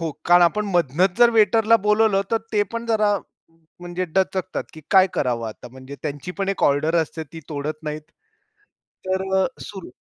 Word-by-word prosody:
हो, 165 Hz, -1 st, -2 dB, 0.2 s
कारण 175 Hz, 0 st, +6 dB
आपण 210 Hz, +5 st, +2 dB
मधनच 175 Hz, +4 st, +2 dB
जर 240 Hz, -1 st, +7 dB
वेटरला 225 Hz, 0 st, +4 dB
बोलावलं 210 Hz, -2 st, +3 dB
तर 230 Hz, -, +2 dB, 0.2 s
ते 210 Hz, -1 st, +3 dB
पण 230 Hz, 0 st, -4 dB
जरा 215 Hz, -2 st, +2 dB, 0.6 s
म्हणजे 175 Hz, +1 st, -4 dB
दचकतात, 190 Hz, -1 st, -1 dB
की 160 Hz, -, -11 dB
काय 190 Hz, -1 st, +6 dB
करावं 120 Hz, -4 st, -1 dB
आता? 110 Hz, +3 st, -11 dB
म्हणजे 130 Hz, +3 st, -11 dB
त्यांची 145 Hz, +2 st, -5 dB
पण 195 Hz, -1 st, -1 dB
एक 195 Hz, -, -2 dB
ऑर्डर 155 Hz, +4 st, +2 dB
असते, 160 Hz, +1 st, -7 dB
ती 165 Hz, +2 st, -11 dB
तोडत 150 Hz, +1 st, -5 dB
नाहीत. 150 Hz, 0 st, -4 dB, 1.1 s
तर 190 Hz, 0 st, 0 dB, 0.2 s
अ, -, -, +2 dB
सुरू 195 Hz, -3 st, -9 dB
180 Hz, 175 wpm, -22 LUFS, 150-205 Hz, 1.1 s, जर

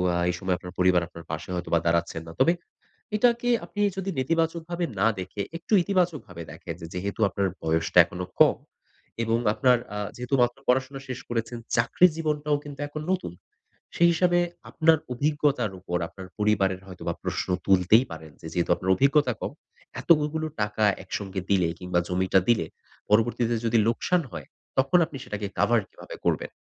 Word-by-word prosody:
আ -, -, +1 dB
এই 85 Hz, -, 0 dB
সময় 95 Hz, -2 st, 0 dB
আপনার 90 Hz, 0 st, -10 dB
পরিবার 90 Hz, -1 st, +4 dB
আপনার 85 Hz, -1 st, -11 dB
পাশে 80 Hz, +3 st, -5 dB
হয়তো 90 Hz, -, -4 dB
বা 85 Hz, -, +5 dB
দাঁড়াচ্ছেন 85 Hz, -1 st, 0 dB
না। 80 Hz, -, -7 dB
তবে 170 Hz, -, +5 dB, 0.6 s
এটাকে 240 Hz, +2 st, +2 dB, 0.2 s
আপনি 205 Hz, -, -9 dB, 0.2 s
যদি 195 Hz, 0 st, -3 dB
নেতিবাচকভাবে 165 Hz, +4 st, -1 dB
না 105 Hz, -, +4 dB
দেখে, 95 Hz, +2 st, -5 dB, 0.2 s
একটু 175 Hz, +6 st, -5 dB
ইতিবাচকভাবে 170 Hz, -, -1 dB
দেখেন 85 Hz, -, -7 dB, 0.2 s
যেহেতু 100 Hz, +4 st, -4 dB
আপনার 100 Hz, +1 st, 0 dB
বয়সটা 80 Hz, +2 st, +2 dB
এখনো 90 Hz, +1 st, -6 dB
কম -, -, +6 dB, 0.7 s
এবং 115 Hz, 0 st, +1 dB, 0.2 s
আপনার 125 Hz, +1 st, +4 dB, 0.2 s
আ -, -, -3 dB, 0.2 s
যেহেতু 125 Hz, +3 st, -1 dB
মাত্র 120 Hz, +1 st, +2 dB
পড়াশোনা 130 Hz, +2 st, +1 dB
শেষ 130 Hz, 0 st, -4 dB
করেছেন, 120 Hz, 0 st, -2 dB, 0.2 s
চাকরির 160 Hz, +9 st, +4 dB
জীবনটাও 150 Hz, -2 st, 0 dB
কিন্তু 145 Hz, -2 st, -10 dB
এখন 150 Hz, +1 st, -6 dB
নতুন। 180 Hz, -, -2 dB, 0.6 s
সেই 170 Hz, -, +5 dB
হিসাবে 175 Hz, +1 st, +3 dB, 0.3 s
আপনার 160 Hz, 0 st, +4 dB, 0.2 s
অভিজ্ঞতার 145 Hz, -5 st, +1 dB
উপর 90 Hz, -2 st, -3 dB
আপনার 95 Hz, -1 st, -10 dB
পরিবারের 100 Hz, -3 st, +1 dB
হয়তো 90 Hz, -1 st, -11 dB
বা 85 Hz, -, 0 dB
প্রশ্ন -, -, -2 dB, 0.2 s
তুলতেই 95 Hz, +6 st, +5 dB
পারেন 80 Hz, -1 st, -9 dB
যে, -, -, -10 dB
যেহেতু 85 Hz, 0 st, -1 dB
আপনার 95 Hz, -, -2 dB
অভিজ্ঞতা 140 Hz, +2 st, +3 dB
কম, -, -, -4 dB, 0.5 s
এতগুগুলো 155 Hz, 0 st, +2 dB, 0.2 s
টাকা 105 Hz, +1 st, 0 dB, 0.2 s
একসঙ্গে 95 Hz, 0 st, -4 dB
দিলে 90 Hz, -4 st, +3 dB
কিংবা 90 Hz, -1 st, 0 dB
জমিটা 95 Hz, +1 st, +2 dB
দিলে, 110 Hz, -9 st, +3 dB, 0.4 s
পরবর্তীতে 115 Hz, +2 st, +2 dB
যদি 115 Hz, +1 st, +3 dB
লোকসান 170 Hz, +9 st, +1 dB
হয়, -, -, -7 dB, 0.3 s
তখন 135 Hz, +7 st, +4 dB
আপনি 145 Hz, -, -10 dB
সেটাকে 105 Hz, 0 st, -4 dB
কাভার 120 Hz, -1 st, +4 dB
কিভাবে -, -, -11 dB
করবেন? -, -, 0 dB
115 Hz, 165 wpm, -26 LUFS, 90-150 Hz, 0.7 s, কম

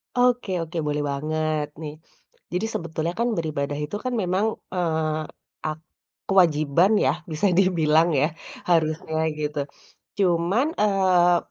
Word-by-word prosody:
Oke 245 Hz, -4 st, +2 dB
oke, 165 Hz, +2 st, -7 dB
boleh 150 Hz, 0 st, -1 dB
banget, 155 Hz, +1 st, -1 dB
nih. 150 Hz, -2 st, -5 dB, 0.6 s
Jadi 180 Hz, +5 st, 0 dB
sebetulnya, 165 Hz, 0 st, -2 dB
kan, 235 Hz, -, +2 dB
beribadah 145 Hz, -3 st, -2 dB
itu 150 Hz, +4 st, -4 dB
kan, 255 Hz, -1 st, -2 dB
memang, 185 Hz, +3 st, +1 dB, 0.3 s
eee, 160 Hz, -3 st, 0 dB, 0.5 s
ak 155 Hz, 0 st, -4 dB, 0.5 s
kewajiban 170 Hz, -1 st, +4 dB
ya, -, -, +4 dB, 0.2 s
bisa 155 Hz, +6 st, +1 dB
dibilang, 165 Hz, -3 st, +4 dB
ya. 140 Hz, +3 st, +3 dB, 0.4 s
Harusnya, 160 Hz, -1 st, +1 dB, 0.2 s
gitu. 150 Hz, 0 st, -2 dB, 0.6 s
Cuman, 185 Hz, -, +2 dB
eee, 185 Hz, -4 st, +4 dB
165 Hz, 120 wpm, -24 LUFS, 155-185 Hz, 0.6 s, kewajiban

